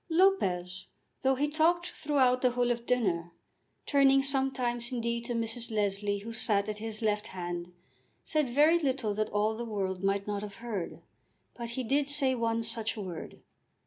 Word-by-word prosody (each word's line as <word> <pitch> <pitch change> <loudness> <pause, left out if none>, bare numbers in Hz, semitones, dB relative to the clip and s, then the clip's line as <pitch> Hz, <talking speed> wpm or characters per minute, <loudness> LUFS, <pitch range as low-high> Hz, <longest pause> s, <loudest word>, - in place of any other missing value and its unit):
Lopez, 185 - +2 0.3
though 265 0 +3
he 290 +3 +1
talked 340 +4 +2
throughout 260 -4 +2
the 255 - +4
whole 245 0 +1
of 235 0 -3
dinner, 180 -9 +1 0.5
turning 275 -1 +5
sometimes 265 -3 0
indeed 235 -1 -2
to 240 -1 -2
Mrs. 230 +1 -3
Leslie 205 -1 0
who 220 +3 -7
sat 210 -2 +1
at 210 0 -3
his 220 0 -3
left 210 0 +1
hand, 175 -2 -5 0.5
said 305 -4 +1
very 300 +7 +5
little 260 -8 0
that 215 +1 -1
all 210 +2 +1
the 235 - -4
world 195 -4 -3
might 200 0 +1
not 205 -1 -2
have 205 -1 -7
heard. 215 -7 -5 0.5
But 235 -1 -6
he 260 - 0
did 275 +4 +1
say 280 -2 +1
one 230 -2 0
such 225 -1 -2
word. 185 -5 -7
230 Hz, 170 wpm, -30 LUFS, 205-265 Hz, 0.5 s, turning